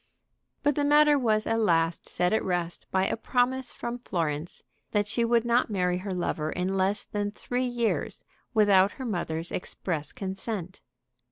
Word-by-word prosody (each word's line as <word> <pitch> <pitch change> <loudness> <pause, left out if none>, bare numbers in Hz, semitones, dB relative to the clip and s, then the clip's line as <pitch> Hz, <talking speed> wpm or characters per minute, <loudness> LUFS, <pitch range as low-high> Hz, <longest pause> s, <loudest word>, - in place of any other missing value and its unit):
But 290 0 +3
the 290 - 0
matter 295 +1 +6
was 215 -3 +1
at 225 - +1
last 165 -5 +1
set 180 +2 +1
at 220 - +2
rest 175 -2 -2
by 190 0 +2
a - - 0
promise 255 +2 +1
from 240 +1 -5
Florence 165 -6 -3 0.3
that 205 -1 +2
she 235 +3 0
would 230 0 +2
not 240 +1 +2
marry 180 -3 0
her 195 +1 -5
lover 160 -4 -2
in 185 +2 -1
less 195 +2 +1
than 205 -1 -2
three 245 +4 -2
years 240 -2 -1 0.3
without 205 -3 +4
her 260 - -7
mother's 170 -6 -3
express 165 -4 -3
consent. 190 -1 -5
205 Hz, 165 wpm, -27 LUFS, 180-235 Hz, 0.3 s, matter